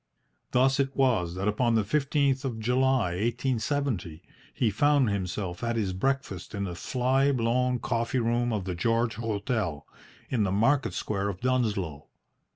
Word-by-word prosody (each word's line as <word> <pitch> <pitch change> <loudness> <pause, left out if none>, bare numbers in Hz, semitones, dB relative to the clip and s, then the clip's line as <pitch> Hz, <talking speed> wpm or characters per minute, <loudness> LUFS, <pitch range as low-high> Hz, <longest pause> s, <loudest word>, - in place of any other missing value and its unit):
Thus 130 +2 +3
it 135 -1 0
was 110 -11 +2
that 95 +2 -2
upon 115 +3 +2
the 110 - +3
15th 140 +2 +1
of 125 -5 -3
July, 125 -3 +2
1870, 115 - -1 0.3
he 115 -4 0
found 140 +1 +3
himself 95 -1 -3
at 115 0 0
his 100 -5 -1
breakfast 110 -3 -2
in 100 - -2
the 90 -3 -4
fly 130 +8 +1
blown 125 0 +1
coffee 115 +1 -1
room 120 0 +1
of 105 -4 -1
the 95 - -2
"George 115 +5 0
Hotel" 105 -8 -2 0.4
in 120 - 0
the 100 -3 +1
market 130 +8 +2
square 100 -1 -2
of 95 -2 -5
Dunsloe. 105 - -1
115 Hz, 155 wpm, -28 LUFS, 100-130 Hz, 0.4 s, Thus